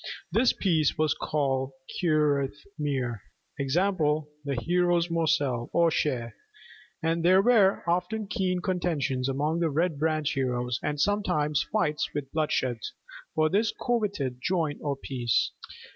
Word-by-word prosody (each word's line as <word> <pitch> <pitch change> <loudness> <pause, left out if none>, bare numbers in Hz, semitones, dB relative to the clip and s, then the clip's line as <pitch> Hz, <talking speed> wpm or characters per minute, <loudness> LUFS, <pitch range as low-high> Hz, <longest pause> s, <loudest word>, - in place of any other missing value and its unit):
This 235 +2 +4
piece 160 -6 +1
was 155 -1 +2
called 135 -3 -1 0.3
curath 150 -5 +2 0.2
mir, 130 -7 -2 0.4
i.e., 140 - 0
'the 150 -4 0
hero's 175 -1 +2
morsel 150 -7 +1
or 170 -1 +4
share'; 120 -7 -1 0.7
and 165 +1 0
there 185 +2 +6
were 210 -5 +4
often 180 +6 0
keen 185 -2 -1
contentions 160 -8 -1
among 150 +5 0
the 170 -1 +1
Red 160 0 0
Branch 155 -1 0
heroes, 125 -3 -1
and 150 -1 -2
sometimes 180 -6 +1
fights 150 -8 0
with 140 -2 -4
bloodshed, 130 -6 0 0.6
for 155 - +3
this 205 +6 +2
coveted 200 - -1
joint 165 -4 0
or 145 -2 -1
piece. 125 -4 0
155 Hz, 130 wpm, -27 LUFS, 140-180 Hz, 0.7 s, there